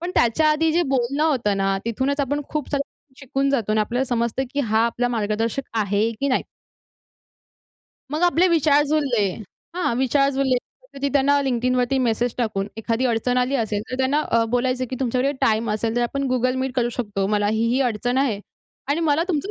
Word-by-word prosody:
पण 350 +2 -3
त्याच्या 275 +7 +3
आधी 320 +1 +2
जे 345 +2 +3
बोलणं 275 +1 0
होतं 235 -10 +1
ना, 195 0 +1
तिथूनच 265 +5 -1
आपण 290 +2 -1
खूप 300 -3 -3
सारं 280 -1 0 0.4
शिकून 275 +1 -1
जातो 230 -6 0
आणि 215 - +2
आपल्याला 245 +5 0
समजतं, 235 +1 -1
की 285 - +1
हा 220 -2 +2
आपला 240 +1 -1
मार्गदर्शक 225 +3 -2
आहे 205 +2 +1
की 280 - +1
नाही. 255 - +1 1.7
मग 305 +3 -2
आपले 350 +1 +4
विचार 300 -4 +4
जुळले 285 -7 +1 0.5
हां, 355 -10 0
विचार 275 +2 +2
जुळले 265 -1 +1
कधी-कधी 280 - -7
त्यांना 285 0 +3
LinkedInवरती 250 0 +1
मेसेज 235 -1 0
टाकून, 210 -4 -1
एखादी 230 +3 -1
अडचण 245 +1 +1
आली 250 +2 +1
असेल 215 -4 -1
तर 255 - -3
त्यांना 265 +3 +2
अ, 230 0 +4
बोलायचं, 255 +1 0
की 260 - -3
तुमच्याकडे 255 +2 +1
टाईम 220 +1 +2
असेल 225 +2 -1
तर 240 - +1
आपण 275 +3 -1
Google 255 +1 +1
Meet 265 -1 -2
करू 240 -2 +1
शकतो, 205 -5 -2
मला 205 0 +1
ही, 220 +2 +1
ही 250 +3 +1
अडचण 245 +3 -2
आहे 260 -7 +1 0.5
आणि 295 +4 +1
मला 300 +3 +3
तुमचा 360 +2 -1
255 Hz, 190 wpm, -22 LUFS, 230-280 Hz, 1.7 s, आपले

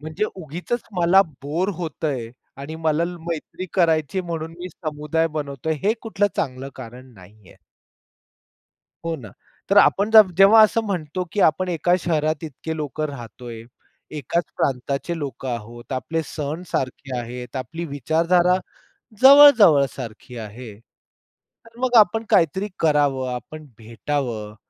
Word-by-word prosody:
म्हणजे 155 +6 -3
उगीचच 180 - -5 0.2
मला 175 +3 +5 0.2
बोअर 160 +7 -1
होतं 160 -2 -4
आहे 120 -5 -4 0.3
आणि 145 +3 -7
मला 160 0 +1 0.2
मैत्री 170 +3 -5
करायची 165 -1 +2
म्हणून 165 -2 -5
मी 180 +1 -6
समुदाय 155 0 -2
बनवत 140 -2 -5
आहे, 160 -1 +1
हे - - +4
कुठलं 210 -3 0
चांगलं 135 -2 -3
कारण 125 +1 -11
नाही 95 +1 -18
आहे. - - -18 1.5
हो 165 0 -2
ना, 115 -8 -11 0.4
तर - - +3
आपण 205 +2 +4
जव 215 -4 +8
जेव्हा 200 +3 +8
असं 215 +1 +3
म्हणतो 180 -3 -3
की 205 - -1
आपण 185 +4 -2
एका 175 +1 +1
शहरात 155 -1 0
इतके 160 +2 -6
लोक 150 -1 -5
राहत 135 -5 -6
आहे, 115 -2 -8 0.6
एकाच 170 +5 -1
प्रांताचे 140 +5 -2
लोक 140 -3 -6
आहोत, 120 0 -6
आपले 160 +5 -2
सण 150 +3 -5
सारखे 130 0 -3
आहेत, 125 +2 -7
आपली 165 +6 -5
विचारधारा 170 +5 +2 0.7
जवळ-जवळ 260 - +8
सारखी 120 0 -9
आहे. 110 +1 -8 0.9
तर 230 0 -19
मग 255 -1 0
आपण 220 +2 +3
काहीतरी 190 0 +2
करावं, 145 -4 +1
आपण 155 +6 -9
भेटावं, 115 -2 -4
155 Hz, 140 wpm, -22 LUFS, 130-175 Hz, 1.5 s, जव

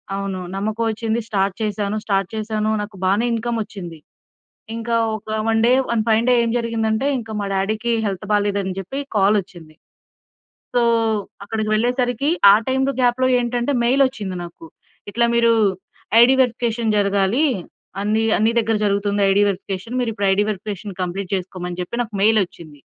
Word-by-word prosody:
అవును. 195 -1 -3 0.2
నమ్మకం 215 +3 -2
వచ్చింది. 225 +1 -1
స్టార్ట్ 195 -3 0
చేశాను. 210 -1 -1
స్టార్ట్ 195 -2 0
చేశాను, 215 0 -1
నాకు 205 0 -7
బాగానే 200 +5 +2
ఇన్‌కమ్ 230 +1 -2
వచ్చింది. 175 -6 -9 0.8
ఇంకా 230 0 -1 0.2
ఒక 215 - -14 0.2
one 225 0 +2
day, - - +4 0.2
one 235 -2 +1
fine 225 +1 +3
day - - +5
ఏం 230 - 0
జరిగిందంటే 230 +1 -1
ఇంకా 225 -2 -7
మా 200 - -2
డాడీ‌కి 215 +4 -1
హెల్త్ 195 +1 -4
బాలేదని 200 -2 0
చెప్పి 195 +9 -5 0.2
కాల్ 200 +1 +4
వచ్చింది. 170 -4 -14 1.0
సో 245 - +3 0.6
అక్కడికి 215 +1 -3
వెళ్ళేసరికి 245 +3 0 0.2
ఆ - - +8
టైమ్‌లో 265 +1 +1
గ్యాప్‌లో 250 +1 +2
ఏంటంటే 240 +2 -1
మెయిల్ 260 +4 +4
వచ్చింది 205 -8 -5
నాకు. 170 -1 -11 0.4
ఇట్లా 235 +3 +2
మీరు 235 0 +4 0.7
ఐడీ 245 +3 +7
వెరిఫికేషన్ 235 -2 -1
జరగాలి. 200 +6 +2 0.6
అన్ని 215 +2 +1 0.2
అన్ని 220 +1 +3
దగ్గర 225 -1 +1
జరుగుతుంది. 200 0 0
ఐడీ 200 +1 +4
వెరిఫికేషన్ 195 +4 -4
మీరు 235 -2 -1 0.2
ఐడీ 200 +2 +2
వెరిఫికేషన్ 205 0 -5
కంప్లీట్ 180 +1 -4
చేసుకోమని 180 -1 -6
చెప్పి 210 +7 -3
నాకు 225 -2 -9
మెయిలోచ్చింది. 180 -8 0
215 Hz, 150 wpm, -20 LUFS, 195-235 Hz, 1.0 s, ఆ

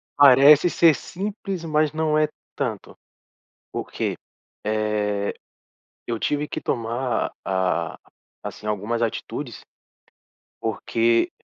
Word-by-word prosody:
Parece 145 +4 +8
ser 165 -4 +5
simples, 195 -1 -5
mas 155 -1 +2
não 155 -1 +1
é 155 0 +3 0.3
tanto, 115 -8 -4 0.8
porque, - - -3 0.5
eh, 105 -1 0 0.7
eu 115 -1 -1
tive 150 0 0
que - - -5
tomar, 120 +1 -1
ah, 95 -3 0 0.5
assim 105 - -7
algumas 105 +3 -1
atitudes, 115 - -3 1.0
porque 115 +1 +1
120 Hz, 95 wpm, -23 LUFS, 105-150 Hz, 1.0 s, Parece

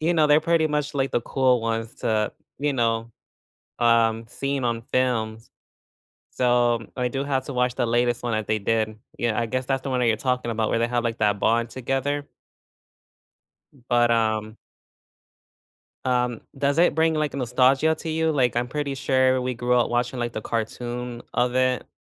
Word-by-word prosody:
you 170 +3 +1
know, 155 -2 +4
they're 150 +1 +5
pretty 165 -1 +2
much, 150 -1 -2
like, 135 -1 0
the - - +1
cool 125 -1 +2
ones 115 0 -3
to, 110 -1 0 0.3
you 145 0 0
know, 115 -2 0 0.7
um, 115 -1 +3
seen 140 +2 -3
on 115 -1 -1
films. 115 -3 -1 0.8
So, 120 -2 +1
I 125 -1 0
do 135 +2 -2
have 135 -2 -1
to 140 - -6
watch 125 0 0
the 120 - +1
latest 120 +1 +1
one 120 - -1
that 110 -1 -2
they 110 0 +1
did. 110 0 -1 0.2
Yeah, 120 -2 -1
I 115 - 0
guess 130 +3 -2
that's 135 0 -1
the 135 - -4
one 125 - 0
that 120 - +2
you're 110 - +2
talking 125 +1 -1
about 110 -1 -1
where 115 - +1
they 115 - +1
have 120 0 -1
like 115 -1 -2
that 105 -2 +2
bond 115 +2 +1
together. 135 +3 -2 1.5
B 130 -5 -23
But, 120 -1 +3
um 110 -1 0 1.5
um, 125 -2 0 0.2
does 140 +2 0
it 175 -3 +4
bring, 160 0 +2
like, 150 -2 -1
nostalgia 135 +4 +3
to 165 - -7
you? 160 0 +1
Like, 125 -4 +1
I'm 120 +1 0
pretty 145 0 -3
sure 130 0 +2
we 125 0 -2
grew 120 +1 0
up 120 -1 +2
watching, 120 +1 -1
like, 120 -1 -2
the 110 - -4
cartoon 120 +2 -4
of 125 0 +1
it. 130 -1 +1
125 Hz, 190 wpm, -24 LUFS, 115-135 Hz, 1.5 s, they're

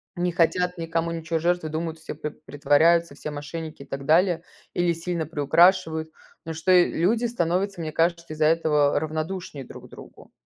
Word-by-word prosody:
не 175 0 0
хотят 180 +1 +1
никому 165 0 -2
ничего 165 0 -2
жертвовать, 170 -2 0
думают, 160 0 -4
все 160 - -7
п 150 0 -5
притворяются, 150 +2 +2
все 150 - -6
мошенники 155 0 -7
и - - -16
так 135 0 -6
далее, 170 +2 +3 0.3
или 175 -1 +1
сильно 165 -1 -3
приукрашивают. 160 +2 +3 0.4
Но 165 - -4
что 165 +4 0
и 180 -1 +5
люди 220 +8 +1
становятся, 190 -3 -1
мне 155 -1 -4
кажется, 170 +1 0
из-за 155 0 +1
этого 150 -3 +3
равнодушнее 155 -1 -5
друг - - -12
другу. - - -14
165 Hz, 165 wpm, -24 LUFS, 155-175 Hz, 0.4 s, и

